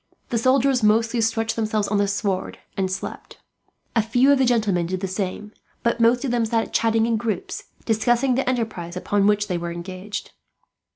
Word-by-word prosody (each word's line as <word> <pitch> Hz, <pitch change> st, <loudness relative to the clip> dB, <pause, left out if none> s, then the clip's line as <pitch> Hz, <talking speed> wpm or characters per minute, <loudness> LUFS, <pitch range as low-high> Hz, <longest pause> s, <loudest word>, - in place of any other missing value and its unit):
The 235 Hz, -, 0 dB
soldiers 260 Hz, +1 st, +3 dB
mostly 225 Hz, +2 st, +3 dB
stretched 225 Hz, 0 st, 0 dB
themselves 215 Hz, -2 st, 0 dB
on 205 Hz, 0 st, +1 dB
the 200 Hz, -, +2 dB
sward 200 Hz, -2 st, -2 dB, 0.2 s
and 190 Hz, -1 st, 0 dB
slept. 185 Hz, -, -6 dB, 0.6 s
A 225 Hz, -, +5 dB
few 245 Hz, +5 st, +3 dB
of 280 Hz, -, +4 dB
the 265 Hz, -, +4 dB
gentlemen 210 Hz, -8 st, +1 dB
did 185 Hz, +1 st, -2 dB
the 195 Hz, -, -2 dB
same, 190 Hz, +2 st, -4 dB, 0.3 s
but 235 Hz, 0 st, +1 dB
most 240 Hz, +3 st, +3 dB
of 260 Hz, -, -1 dB
them 240 Hz, -1 st, +1 dB
sat 225 Hz, 0 st, -1 dB
chatting 225 Hz, 0 st, +2 dB
in 230 Hz, -1 st, +1 dB
groups, 210 Hz, -4 st, -3 dB, 0.2 s
discussing 240 Hz, +3 st, +2 dB
the 255 Hz, 0 st, 0 dB
enterprise 215 Hz, -8 st, -3 dB
upon 200 Hz, +2 st, +1 dB
which 210 Hz, 0 st, +2 dB
they 180 Hz, -4 st, -1 dB
were 170 Hz, 0 st, -4 dB
engaged. 185 Hz, +4 st, -6 dB
220 Hz, 185 wpm, -23 LUFS, 195-235 Hz, 0.6 s, A